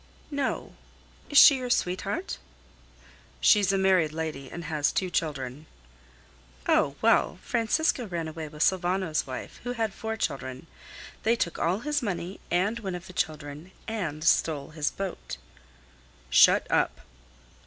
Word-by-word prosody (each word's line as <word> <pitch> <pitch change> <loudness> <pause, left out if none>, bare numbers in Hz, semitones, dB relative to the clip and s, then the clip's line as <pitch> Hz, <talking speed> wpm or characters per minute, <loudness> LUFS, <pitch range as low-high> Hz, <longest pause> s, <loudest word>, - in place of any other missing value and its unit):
"No. 285 -2 -2 0.6
Is 290 - +1
she 280 - +10
your 250 -1 -4
sweetheart?" 195 - -1 1.0
"She's 205 -2 +5
a 195 - +1
married 185 -5 +3
lady, 155 -4 -4
and 170 - -7
has 155 -2 0
two 185 -2 -1
children." 145 -3 -3 1.0
"Oh! 140 - +3
well! 225 -5 +3
Francisco 245 +2 +1
ran 170 -3 -3
away 160 0 -6
with 150 +1 -2
Sylvano's 185 -4 +1
wife, 130 - -7
who 245 0 -3
had 225 -4 -1
four 220 +1 -4
children. 130 - -3 0.6
They 230 +2 +3
took 170 -7 -2
all 185 +6 +1
his 295 +1 0
money 190 -3 -4
and 200 +6 +1
one 190 -5 -4
of 175 0 -8
the 185 - -11
children 150 +1 -3 0.2
and 170 -9 -3
stole 155 -3 +2
his 150 -2 -1
boat." 195 -2 -6 0.9
"Shut - - +6
up!" - - +1
180 Hz, 140 wpm, -27 LUFS, 155-220 Hz, 1.0 s, she